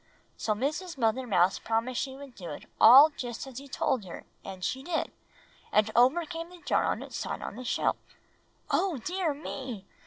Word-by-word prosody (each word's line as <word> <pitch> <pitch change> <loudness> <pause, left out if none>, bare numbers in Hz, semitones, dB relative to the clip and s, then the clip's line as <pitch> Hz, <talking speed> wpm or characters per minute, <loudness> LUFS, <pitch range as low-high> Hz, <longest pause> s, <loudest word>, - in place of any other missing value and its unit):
So 215 - 0
Mrs. 300 - -3
Mother 245 +1 +1
Mouse 185 -3 +3
promised 230 +2 -1
she 265 -1 -4
would 275 -1 -11
do 180 -6 -8
it 145 - -8 0.2
all 275 +7 +10
just 245 -4 -6
as 265 -2 -8
he 280 - -11
told 260 -3 0
her, 175 - -9 0.2
and 185 -2 -6
she 265 - -2
did. 325 +3 -2 0.6
And 215 +1 +3
over 260 +8 +4
came 330 +1 -6
the 360 - -13
jar - - +1
on - - -1
its - - -9
side - - -4
on - - -6
the 255 - -7
shelf!" - - 0 0.7
"Oh, 375 -6 +1
dear 345 +4 -1
me!" 255 -8 -6
260 Hz, 190 wpm, -29 LUFS, 225-300 Hz, 0.7 s, all